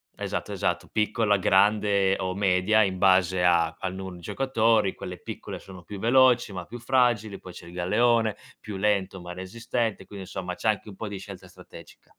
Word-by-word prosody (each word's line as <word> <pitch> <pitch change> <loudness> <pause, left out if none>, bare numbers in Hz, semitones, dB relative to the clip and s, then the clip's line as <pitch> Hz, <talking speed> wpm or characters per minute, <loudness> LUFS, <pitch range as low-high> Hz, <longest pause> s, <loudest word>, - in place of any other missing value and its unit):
esatto, - - -4
esatto, - - -1
piccola, 105 -1 +1
grande 100 0 +3
o 95 0 -2
media 100 +2 +3
in 95 -2 -1
base 95 -1 +3
a 85 -2 +3
al 95 0 -4
numero 95 -1 -7
di 85 - -13
giocatori, 110 -2 +1
quelle 90 0 -8
piccole - - -7
sono 95 -2 -12
più 100 +2 -8
veloci, 120 -2 +4
ma 90 - -5
più 120 - -9
fragili, 120 -5 +1
poi 90 - -11
c'è 85 - -12
il 85 - -12
galeone, 110 +5 +2 0.2
più 105 -3 -6
lento, 100 -2 0
ma 90 0 -8
resistente, 110 +3 -3
quindi 100 0 -9
insomma 90 -1 -5
c'è 110 - -1
anche 105 0 -1
un 100 - -9
po' 105 0 -6
di 100 - -5
scelta 95 -2 -10
strategica. - - -15
100 Hz, 185 wpm, -26 LUFS, 95-110 Hz, 0.2 s, veloci